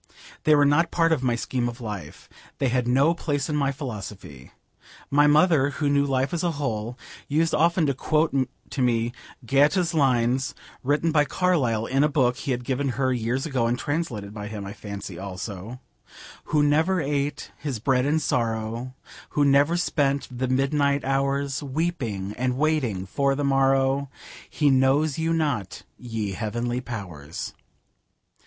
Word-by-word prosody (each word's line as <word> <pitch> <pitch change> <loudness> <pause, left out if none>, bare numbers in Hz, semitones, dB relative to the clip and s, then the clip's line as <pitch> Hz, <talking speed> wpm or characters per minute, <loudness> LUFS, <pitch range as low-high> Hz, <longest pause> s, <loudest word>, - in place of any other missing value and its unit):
They 155 - +6
were 145 0 +5
not 155 +4 +3
part 165 -1 +2
of 155 -5 +2
my 125 -2 +1
scheme 120 0 -1
of 120 +1 -9
life. 105 -5 -7 0.3
They 135 - +1
had 125 0 0
no 135 +7 +4
place 145 -5 -2
in 150 - -1
my 140 -2 +1
philosophy. 105 - -8 0.6
My 145 +1 +5
mother, 150 -2 +4
who 145 -2 +1
knew 140 0 +3
life 135 +1 0
as 170 - -1
a 170 -2 +1
whole, 120 -5 -3 0.3
used 160 +3 +1
often 170 +1 +3
to 140 - +1
quote 155 +4 +1 0.4
to 135 - -2
me 120 -1 +1 0.3
Goethe's 150 - +3
lines 130 -3 +2 0.3
written 145 +5 +1
by 150 -2 +4
Carlyle 140 -12 +1
in 135 +4 +2
a 150 - +3
book 130 -4 +2
he - - -6
had 125 -1 -1
given 135 +2 -1
her 130 -1 +2
years 120 +2 -1
ago, 130 -7 0
and 120 +1 0
translated 125 -10 -3
by 105 -1 -6
him, 105 -2 -6
I 100 - -6
fancy, 100 -4 -7
also: 100 +4 -6 0.7
'Who 150 -1 +2
never 160 +6 +3
ate 145 -1 -2
his 140 -5 -3
bread 125 +3 +1
in 150 +2 +2
sorrow, 115 -2 -2 0.4
Who 145 - +5
never 140 +4 +4
spent 140 -5 0
the 130 +1 -1
midnight 140 +2 +1
hours 135 +1 0
Weeping 130 - -2
and 125 0 0
waiting 135 -11 0
for 140 +8 0
the 145 - -2
morrow, 135 0 +2 0.4
He 145 -2 +2
knows 135 +3 +3
you 165 +1 0
not, 145 - -1
ye 115 -4 -4
heavenly 120 +5 -2
powers.' 90 - -6
135 Hz, 160 wpm, -25 LUFS, 120-145 Hz, 0.7 s, They